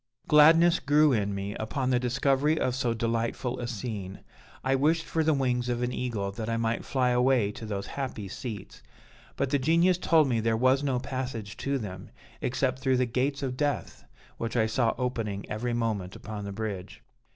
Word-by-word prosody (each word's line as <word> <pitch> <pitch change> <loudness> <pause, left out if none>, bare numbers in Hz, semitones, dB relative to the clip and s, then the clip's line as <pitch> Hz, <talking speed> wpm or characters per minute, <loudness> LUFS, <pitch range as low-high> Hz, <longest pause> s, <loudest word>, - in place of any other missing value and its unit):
"Gladness 165 +3 +6
grew 145 +1 +4
in 100 -3 0
me 100 +1 -4
upon 130 +5 -2
the 125 - +3
discovery 135 +4 +1
of 125 - 0
so 120 -2 0
delightful 115 +2 -1
a 120 - -3
scene. 105 -5 -5 0.4
I 130 - +1
wished 155 +5 +2
for 160 - 0
the 155 -1 +3
wings 125 -2 0
of 120 0 -1
an 125 0 -1
eagle, 110 -6 -2
that 110 +2 -5
I 115 - 0
might 115 0 -1
fly 130 -2 +1
away 125 -4 +3
to 110 +1 -8
those 100 -2 -3
happy 130 -7 -5
seats; 105 -1 -7 0.5
but 130 - -1
the 145 - +3
Genius 170 +6 +3
told 160 -4 +4
me 120 -3 +1
there 115 0 +1
was 130 +3 +3
no 135 -3 0
passage 125 -5 -4
to 140 0 -1
them, 95 -6 -7 0.3
except 130 +1 0
through 130 -1 +2
the 125 - +2
gates 135 +4 -1
of 130 -2 -2
Death, 145 +1 -2 0.4
which 115 +1 -2
I 110 - +4
saw 115 +1 +1
opening 115 -6 -3
every 120 +3 -2
moment 105 -5 -2
upon 105 -1 -7
the 100 - -5
bridge. 100 -3 -5
125 Hz, 190 wpm, -28 LUFS, 110-135 Hz, 0.5 s, Gladness